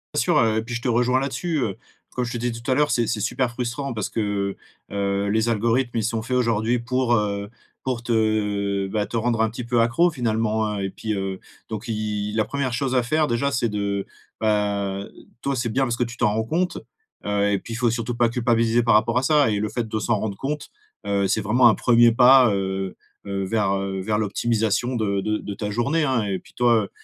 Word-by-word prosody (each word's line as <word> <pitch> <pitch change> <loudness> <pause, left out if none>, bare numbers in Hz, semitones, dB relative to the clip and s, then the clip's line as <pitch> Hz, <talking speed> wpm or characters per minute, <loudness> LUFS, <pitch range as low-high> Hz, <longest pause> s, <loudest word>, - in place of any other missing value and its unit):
Bien - - +2
sûr, - - +2
heu, 110 -1 +2
puis 120 +1 -5
je 120 - -3
te - - -1
rejoins 125 +2 +2
là-dessus, 155 +5 -2
heu, 100 -5 -2 0.4
comme 125 - -2
je 120 - -4
te - - -2
disais 120 +1 -1
tout 120 - -6
à - - +3
l'heure, 150 +1 +2
c'est 120 -2 +1
c'est 110 - -1
super 120 +4 0
frustrant 120 +2 -4
parce 105 - -2
que, 100 -2 -1 0.4
heu - - -6
heu, 100 0 0
les 110 +2 +1
algorithmes, 115 +2 +1
ils 110 - 0
sont 115 0 -1
faits 125 +3 -1
aujourd'hui 115 -1 +1
pour, 120 +1 +1
heu, 100 -2 -1 0.3
pour 125 -3 -3
te, 120 - -3
heu 105 -3 0
bah, 105 0 -1
te 115 - -3
rendre 115 0 +1
un 110 - +2
petit 120 +2 -6
peu 120 0 +1
accro 145 +10 +3
finalement 110 -5 0
hein 105 -1 -3
et 95 0 -2
puis, 110 +2 -4
heu, 95 -1 -3 0.3
donc 110 -2 -6
il 105 -1 -2
la 110 -1 +2
1re 140 -3 -2
chose 130 +2 -1
à 125 - +4
faire 155 +6 +1
déjà, 140 +1 0
c'est 120 -3 0
de, 100 -1 -2 0.3
bah, 100 -2 0
heu, - - -10 0.3
toi 140 0 -1
c'est 120 -2 -1
bien 130 +5 0
parce 120 -3 -1
que 125 - +1
tu 120 0 -6
t'en 120 -4 +2
rends 110 +1 0
compte. 175 +10 -1 0.5
Heu 100 0 +1
et 100 - +2
puis 115 - -8
il - - -3
faut 120 0 +2
surtout 115 +1 -2
pas 120 -1 +3
culpabiliser 115 0 +2
par 115 - +3
rapport 115 +3 +3
à 130 - +2
ça 145 -2 +4
et 105 - 0
le 105 - -1
fait 115 +2 -3
de 110 - -3
s'en 110 0 0
rendre 100 -2 -3
compte, 145 +5 -4 0.4
heu, 100 -1 +1
c'est 110 - +1
vraiment 120 +4 +5
un - - +4
1er 120 -1 +5
pas, 125 0 +6
heu 95 -1 -2 0.3
heu, 100 -1 -2
vers, 105 0 0
heu, 95 -1 -2
vers 105 +2 0
l'optimisation 115 +3 0
de 100 -3 0
de 110 +2 0
de 105 - -6
ta 105 0 -4
journée 140 +9 +1
hein 130 -6 +1
et 100 -2 -1
puis - - -20
toi, 120 -3 +3
heu, 100 - -7
115 Hz, 240 wpm, -23 LUFS, 105-120 Hz, 0.5 s, pas